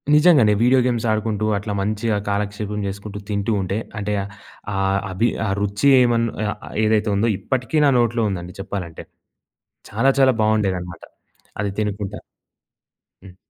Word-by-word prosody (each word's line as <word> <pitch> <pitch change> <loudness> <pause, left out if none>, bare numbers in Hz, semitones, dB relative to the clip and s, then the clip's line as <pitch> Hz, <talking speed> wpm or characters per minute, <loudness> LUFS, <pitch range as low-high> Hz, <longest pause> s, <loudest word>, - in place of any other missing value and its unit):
నిజంగానే 150 -9 +5
video 130 +2 +5
games 120 -2 0
ఆడుకుంటూ, 110 -1 -1
అట్లా 105 +1 -4
మంచిగా 105 +2 -1
కాలక్షేపం 105 +1 -2
చేసుకుంటూ, 100 +1 -6
తింటూ 100 +2 -1
ఉంటే, 95 +2 -2 0.2
అంటే 105 0 -2 0.6
ఆ - - -3 0.4
అభి 110 +6 +1 0.2
ఆ - - -1
రుచి 105 +7 +1
ఏమన్ 115 -1 +2 0.2
ఆహ్, 105 - -2 0.3
ఏదైతే 110 0 +2
ఉందో 110 +4 +2
ఇప్పటికీ 130 +5 -2
నా 140 - +5
నోట్లో 120 -1 +1
ఉందండి 90 -1 -6
చెప్పాలంటే. 90 -4 -6 0.9
చాలా 135 - +2
చాలా 130 -1 +6
బావుండేదన్నమాట. 95 -5 -1 0.6
అది 100 -1 -1
తినుకుంటా 105 -1 -3 1.1
హ్మ్. 95 -2 -14
105 Hz, 135 wpm, -21 LUFS, 100-115 Hz, 1.1 s, చాలా